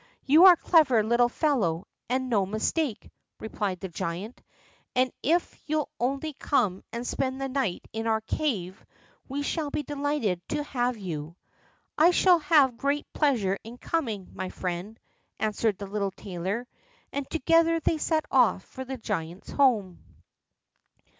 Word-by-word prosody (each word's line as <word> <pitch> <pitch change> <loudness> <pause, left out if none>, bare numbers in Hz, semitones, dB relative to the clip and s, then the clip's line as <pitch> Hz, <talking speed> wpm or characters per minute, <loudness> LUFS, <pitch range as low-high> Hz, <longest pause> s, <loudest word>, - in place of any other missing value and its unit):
"You 310 +7 +7
are 370 - +11
a - - -3
clever 280 -11 +4
little 235 +2 +3
fellow, 215 - 0 0.2
and 260 +1 0
no 215 -6 +2
mistake," 220 - -2 0.3
replied 205 -4 -3
the 190 - -3
giant, 180 +6 -5 0.5
"and 255 0 +3
if 335 +5 0
you'll 305 -1 0
only 275 +5 -1
come 225 -10 0
and 235 +1 -4
spend 260 +1 -2
the 270 - -2
night 260 -9 -2
in 225 +1 -3
our 220 -1 +1
cave, 215 - -2 0.5
we 285 +2 -2
shall 305 0 -2
be 295 - -2
delighted 285 -10 -1
to 295 0 -1
have 245 -4 -1
you." 165 -5 -6 0.6
"I 325 +3 +7
shall 360 0 +5
have 290 -6 +4
great 285 +3 0
pleasure 220 -10 +1
in 230 +2 -10
coming, 230 - -3
my 185 - -4
friend," 185 +6 -5 0.4
answered 215 -1 0
the 200 - -6
little 200 0 -2
tailor, 190 +5 -4 0.5
and 280 -1 -3
together 330 +2 +3
they 320 0 0
set 315 0 0
off 240 -7 +4
for 260 - -8
the 265 0 -6
giant's 185 -5 -5
home. 220 -10 +2
245 Hz, 150 wpm, -27 LUFS, 200-290 Hz, 0.6 s, are